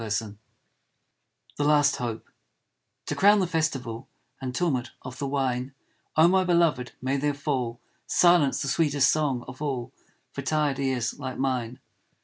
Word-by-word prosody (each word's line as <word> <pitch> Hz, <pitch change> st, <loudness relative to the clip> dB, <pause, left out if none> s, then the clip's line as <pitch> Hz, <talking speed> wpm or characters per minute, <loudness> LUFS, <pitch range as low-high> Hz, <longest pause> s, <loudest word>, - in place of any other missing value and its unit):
75 110 Hz, -1 st, -3 dB, 1.2 s
THE 145 Hz, -, 0 dB
LAST 145 Hz, -1 st, +4 dB
HOPE 120 Hz, -4 st, -4 dB, 0.8 s
To -, -, -3 dB
crown 205 Hz, +2 st, +6 dB
the 190 Hz, -, +2 dB
festival 135 Hz, -9 st, -2 dB, 0.3 s
And 130 Hz, -1 st, -4 dB
tumult 135 Hz, -8 st, 0 dB
of 130 Hz, 0 st, -8 dB
the 140 Hz, -, -2 dB
wine, 135 Hz, -1 st, -2 dB, 0.4 s
Oh, 160 Hz, +2 st, +7 dB
my 190 Hz, +1 st, +3 dB
beloved, 170 Hz, -8 st, +1 dB
may 135 Hz, +2 st, 0 dB
there 145 Hz, +1 st, 0 dB
fall 130 Hz, -5 st, -2 dB, 0.3 s
Silence, 175 Hz, -6 st, +4 dB
the -, -, -3 dB
sweetest 145 Hz, -1 st, +3 dB
song 140 Hz, -6 st, 0 dB
of 130 Hz, +2 st, -10 dB
all 130 Hz, -5 st, -3 dB, 0.4 s
For -, -, -5 dB
tired 150 Hz, -3 st, 0 dB
ears 130 Hz, -2 st, -1 dB
like 130 Hz, -2 st, -5 dB
mine. 125 Hz, -2 st, -2 dB
135 Hz, 145 wpm, -26 LUFS, 125-150 Hz, 1.2 s, Oh